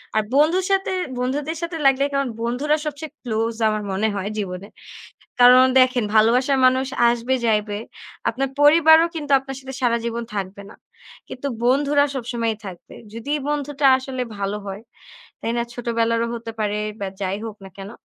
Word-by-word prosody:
আর 215 - +3
বন্ধুর 335 +6 +3
সাথে, 385 -1 +1 0.3
বন্ধুদের 290 +5 -2
সাথে 335 -1 -4
লাগলে, 270 +1 +3
কারন 275 -2 0
বন্ধুরা 260 +6 0
সবচেয়ে 300 +1 -5
ক্লোজ 225 -1 -2
আমার 215 -1 -1
মনে 205 +3 0
হয় 200 +1 -3
জীবনে। 190 -1 -5 0.7
কারণ 250 +1 +8 0.2
দেখেন 255 -3 +3
ভালোবাসার 250 +5 +4
মানুষ 260 +1 +2 0.2
আসবে 240 +2 0
যাইবে। 210 -1 0 0.5
আপনার 270 +3 -2
পরিবারও 320 +2 +6
কিন্তু 295 -3 -6
আপনার 270 0 -8
সাথে 265 0 -9
সারা 235 -1 +3
জীবন 235 0 -3
থাকবে 200 0 -5
না। - - -13 0.5
কিন্তু 265 +2 -6 0.2
বন্ধুরা 285 +3 +3
সবসময়ই 230 -3 -2
থাকবে। 180 -3 -10 0.2
যদি 230 +6 -5 0.2
বন্ধুটা 290 -1 -1
আসলে 260 -1 -5 0.2
ভালো 200 +1 -2
হয়, 195 +2 -6 0.6
তাই 230 - -1
না? - - +1
ছোটবেলারও 230 -1 0
হতে 230 -1 -7
পারে 210 0 -1 0.2
বা 200 - -2 0.2
যাই 195 +1 -2
হোক 215 -1 -8
না 190 - -11
কেন? 195 +1 -8
245 Hz, 160 wpm, -22 LUFS, 215-280 Hz, 0.7 s, কারণ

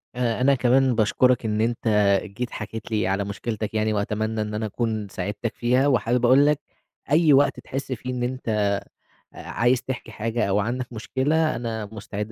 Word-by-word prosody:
آآ 120 -1 -1
أنا 140 +2 +4
كمان 130 0 +3
باشكرك 120 +2 +2
إن 105 0 0
أنت 115 0 -1 0.4
جيت 110 +4 -5
حكيت 110 +2 -7
لي 110 0 +1
على 100 +1 0
مشكلتك 110 +2 -4
يعني، 110 0 +1
وأتمنى 110 +1 -1
إن 105 0 -4
أنا 110 +1 -2
أكون 110 -1 -2
ساعدتك 105 +6 -4
فيها، 125 +4 +2
وحابب 125 -1 +2
أقول 135 +4 +6
لك، 150 0 +2 0.5
أي 155 -1 +5
وقت 140 +1 +3
تحس 135 0 -6
فيه 125 +1 -4
إن 125 -1 -2
أنت 105 -5 0 0.5
عايز 120 +3 0
تحكي 125 -3 -5
حاجة 115 +2 -1
أو 100 +2 +2
عندك 120 +4 -3
مشكلة، 145 +8 0
أنا 115 -3 -4
مستعد 105 0 -6
115 Hz, 170 wpm, -24 LUFS, 110-125 Hz, 0.5 s, أقول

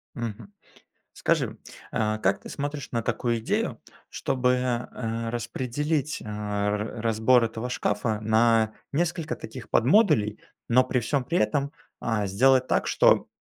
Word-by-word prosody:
Мгм. 115 - -6 0.6
Скажи, - - 0 0.3
э, 110 0 0
как - - +1
ты - - -11
смотришь 145 0 -4
на 115 -1 0
такую 120 +1 0
идею, 110 - -1 0.3
чтобы, 130 -2 0
э, 120 -2 -2
распределить, 135 +5 -2
э, - - -12
раз 105 0 -2 0.2
разбор 115 +3 +4
этого 115 +2 -4
шкафа 105 -2 -1
на 110 0 +3 0.2
несколько 160 +1 -1
таких 125 -5 -9
подмодулей, 120 - +3 0.3
но 125 +2 +5
при 130 0 0
всём 130 +3 -1
при 170 +7 0
этом, 145 -4 0 0.3
а, 105 -3 0
сделать 130 +6 +4
так, - - +1
что - - +4
120 Hz, 135 wpm, -26 LUFS, 110-135 Hz, 0.6 s, но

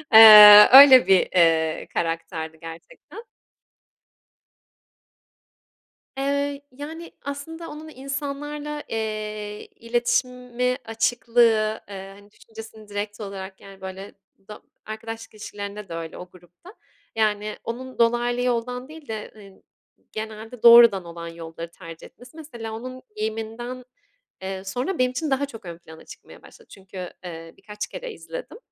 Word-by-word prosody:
ııı, 210 -1 +11
öyle 265 -6 +10
bir, 190 -2 +4 0.5
ııı, - - -12
karakterdi 165 -1 -4
gerçekten. 165 - -12 2.9
Eee, 280 +1 -2
yani 315 +5 -9
aslında 325 +4 -7
onun 310 +1 -10
insanlarla, 290 +2 -6
eee, 215 -1 -5
iletişimi, 250 +1 -2
açıklığı, 225 -1 +1
eee, 195 0 -9
hani 205 0 -20
düşüncesini 220 -1 -13
direkt 205 +1 -5
olarak 195 -1 -8
yani 195 -1 -15
böyle 190 +1 -9 0.4
do 210 - -10 0.3
arkadaşlık 225 +1 -8
ilişkilerinde 205 -1 -8
de - - -7
öyle 165 -1 -7
o 180 0 -10
grupta. 180 - -18 0.4
Yani 215 -1 -1
onun 255 +2 -7
dolaylı 240 +1 +1
yoldan 250 +1 -2
değil 310 -2 -13
de, 220 -1 -7
ııı, 195 -2 -16 0.5
genelde 220 +2 -8
doğrudan 235 -6 +7
olan 170 0 -9
yolları 165 0 -9
tercih 165 -3 -12
etmesi. 250 +6 -18
Mesela 235 -8 -9
onun 255 +3 -8
giyiminden, 225 +4 -5 0.6
eee, 190 0 -6
sonra 250 - -4
benim 250 0 +2
için 300 +4 -4
daha 270 +1 +1
çok 225 -8 -13
ön 170 -1 -8
plana 160 -2 -15
çıkmaya - - -15
başladı 470 - -18
çünkü, 190 -1 -14 0.3
ııı, 165 -1 -10
birkaç 210 0 -7
kere - - -8
izledim - - -9
225 Hz, 125 wpm, -23 LUFS, 200-255 Hz, 2.9 s, ııı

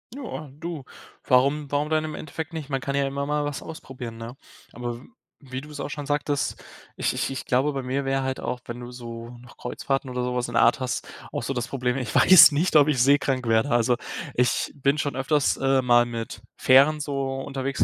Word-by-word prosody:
Ja, 215 - -7
du, 165 0 -6 0.4
warum 140 +3 +3
warum 145 +1 0
denn 155 0 +1
im 155 -1 -5
Endeffekt 160 +2 -6
nicht? 155 -3 -6
Man 135 -1 -1
kann 140 +1 -3
ja 140 0 +2
immer 140 +1 -3
mal 150 +1 0
was 145 -1 -4
ausprobieren, 130 -7 -8
ne? 115 +3 -8 0.4
Aber 120 0 -4
w - - -15 0.3
wie 130 -2 -7
du 150 - -12
es 150 -1 -9
auch - - -4
schon 145 -1 -6
sagtest, 145 -1 -1 0.3
ich - - 0
ich - - -1
ich 135 -1 -5
glaube 130 +4 +2
bei 135 -1 -3
mir 135 +2 -2
wäre 135 0 0
halt 130 0 -2
auch, 125 - -3
wenn 120 0 -7
du 120 0 -8
so 115 -1 -8
noch 120 0 -16
Kreuzfahrten 135 +2 -3
oder 125 0 -2
so 125 0 -2
was 125 0 -1
in 120 - -7
der - - +5
Art 115 - +4
hast, 130 -1 -3 0.2
auch - - -3
so 135 - -2
das 120 -1 -3
Problem, 125 -2 -1
ich 125 -5 -4
weiß 165 -4 +9
nicht, 160 +4 0
ob 145 -1 +7
ich 150 -4 +1
seekrank 135 -2 +2
werde. 115 +4 +2
Also, 120 0 +2 0.4
ich 125 0 +1
bin 140 +1 +1
schon 145 -3 -2
öfters, 135 +2 +1
äh, 135 0 +2
mal 120 -1 +5
mit 115 -3 -6 0.2
Fähren 140 +4 +5
so 140 -2 -2
unterwegs 135 0 -1
135 Hz, 225 wpm, -25 LUFS, 125-145 Hz, 0.4 s, weiß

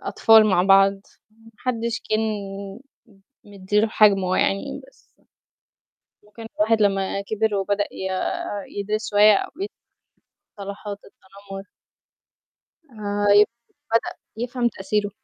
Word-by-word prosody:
أطفال 220 -1 +5
مع 190 -3 +3
بعض 195 +1 +5 0.4
ما 225 +1 -20
حدش 235 -2 -2
كان 215 0 +2 1.2
م 205 - -17
مدِّي 200 +1 0
له 220 - +1
حجمه 195 -4 +3
يعني 195 - -1
بس - - -27 1.1
ممكن 210 +2 -12
الواحد 220 +1 +2
لما 195 -1 +1
كبر 220 +1 -1
وبدأ 200 +1 0
ي 190 - -5 0.7
يدرس 215 +2 -3
شوية 210 0 +6
أو - - -3
ي 400 - -1 0.9
مصطلحات 200 +1 -6
التنمر. 195 0 -12 1.3
آآ، 205 -2 -3
يمكن 230 +3 +2 0.2
بدأ 230 - +1 0.2
يفهم 240 +1 -1
تأثيره. 205 0 -2
205 Hz, 115 wpm, -22 LUFS, 195-220 Hz, 1.3 s, شوية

